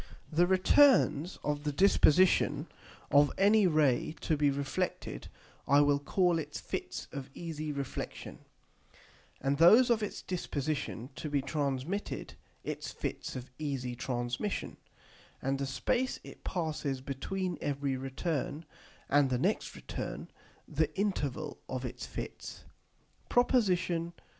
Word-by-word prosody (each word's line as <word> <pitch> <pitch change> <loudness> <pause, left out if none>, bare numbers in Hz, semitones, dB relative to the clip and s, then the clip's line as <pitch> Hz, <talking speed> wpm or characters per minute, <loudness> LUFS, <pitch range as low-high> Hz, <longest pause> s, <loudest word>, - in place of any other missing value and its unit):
The 170 +3 +4
returns 185 - +4
of 145 0 -1
the 150 - 0
disposition 185 +1 +4 0.5
of 145 0 +6
any 205 0 +5
Ray 155 -2 +2
to 160 - +1
be 145 -1 +3
reflected 140 0 -3 0.4
I 140 +1 +6
will 145 -1 +3
call 175 +4 +2
its 150 -1 -5
Fits - - -5
of 140 -1 -6
easy 155 -3 -4
Reflexion, 140 -2 -5 1.0
and 140 +1 0
those 225 +9 +7
of 225 -2 +3
its 210 - -4
disposition 145 -7 -3
to 155 - -4
be 140 -2 0
transmitted 140 +6 -2 0.3
its - - -4
Fits - - -5
of 130 0 -7
easy 135 -5 -3
Transmission, 120 - -3 0.6
and 135 +1 -1
the 140 - -1
space 240 - 0
it - - -12
passes 155 -6 -2
between 170 +7 -3
every 140 -1 -1
return 145 +4 -3 0.4
and 145 -1 +4
the 125 - +1
next 190 - 0
return, - - -6 0.4
the - - +1
Interval 155 -7 -2
of 130 0 -3
its 125 - -6
Fits. - - -7 0.7
PROP. 245 0 +3
XIII. 175 -4 0
150 Hz, 125 wpm, -31 LUFS, 135-180 Hz, 1.0 s, those